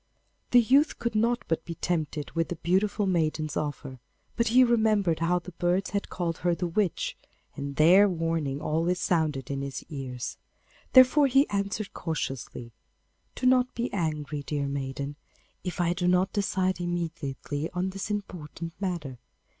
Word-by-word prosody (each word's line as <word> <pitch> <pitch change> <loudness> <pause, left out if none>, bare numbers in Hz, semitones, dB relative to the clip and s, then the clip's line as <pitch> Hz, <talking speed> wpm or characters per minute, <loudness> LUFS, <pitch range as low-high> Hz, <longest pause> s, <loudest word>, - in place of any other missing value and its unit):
The 245 - +7
youth 270 +6 +4
could 235 -1 -2
not 235 +3 +1
but 165 0 -1
be 170 - -6
tempted 155 -3 -2
with 165 -1 -1
the 175 - -3
beautiful 200 +5 +1
maiden's 155 -4 0
offer, 140 -3 -4 0.4
but 235 - +1
he 250 +3 +6
remembered 215 -8 +2
how 170 +2 +2
the 180 +1 -7
birds 180 +3 0
had 200 0 -2
called 170 -2 -3
her 175 0 +1
the 175 - -2
witch, 175 +1 -1 0.4
and 140 0 -5
their 185 +7 +6
warning 165 -5 -1
always 165 +4 0
sounded 150 -7 0
in 140 0 -2
his 140 -1 -5
ears. 130 -4 -5 0.6
Therefore 260 +3 +7
he 270 +3 +4
answered 200 +1 -2
cautiously, 135 -7 -4 0.6
'Do - - -4
not 255 0 +3
be 235 +1 -2
angry, 150 -5 -2
dear 140 0 -2
maiden, 140 +1 -4 0.5
if 180 -1 -4
I 175 0 +2
do 180 0 -1
not 180 +2 +2
decide 185 -2 0
immediately 160 -4 -3
on 180 +1 -1
this 195 +2 -5
important 170 -5 -5
matter. 160 -10 -3
175 Hz, 155 wpm, -27 LUFS, 150-200 Hz, 0.6 s, The